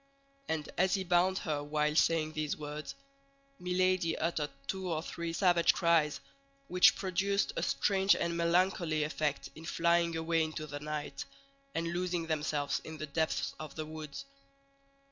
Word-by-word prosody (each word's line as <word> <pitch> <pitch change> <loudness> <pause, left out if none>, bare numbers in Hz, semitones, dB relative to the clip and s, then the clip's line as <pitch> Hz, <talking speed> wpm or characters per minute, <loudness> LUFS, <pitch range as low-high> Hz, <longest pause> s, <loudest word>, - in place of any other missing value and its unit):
And 160 -2 -1
as 185 +2 +4
he 190 - -1
bound 180 +1 +3
her 155 -7 -2
while 150 +1 0
saying 160 -1 +3
these 155 -1 -2
words, 150 -1 -6 0.6
Milady 180 -2 +1
uttered 160 -2 -1 0.2
two 190 -2 -3
or 160 0 -1
three 170 -1 -4
savage 175 -1 +4
cries, 165 -4 +3 0.5
which 180 +1 +6
produced 200 +1 0
a - - -1
strange 195 -1 +3
and 170 0 -1
melancholy 170 -2 +2
effect 150 -2 -2
in 155 - -11
flying 170 0 +2
away 165 0 +1
into 155 -1 -4
the 145 -1 -6
night, 150 0 -5 0.5
and 165 +1 -1
losing 175 -1 -1
themselves 150 -2 -1
in 160 0 -8
the 155 - -4
depths 160 +2 -1
of 155 -2 -8
the 155 - -4
woods. 155 - -7
165 Hz, 150 wpm, -32 LUFS, 155-175 Hz, 0.6 s, which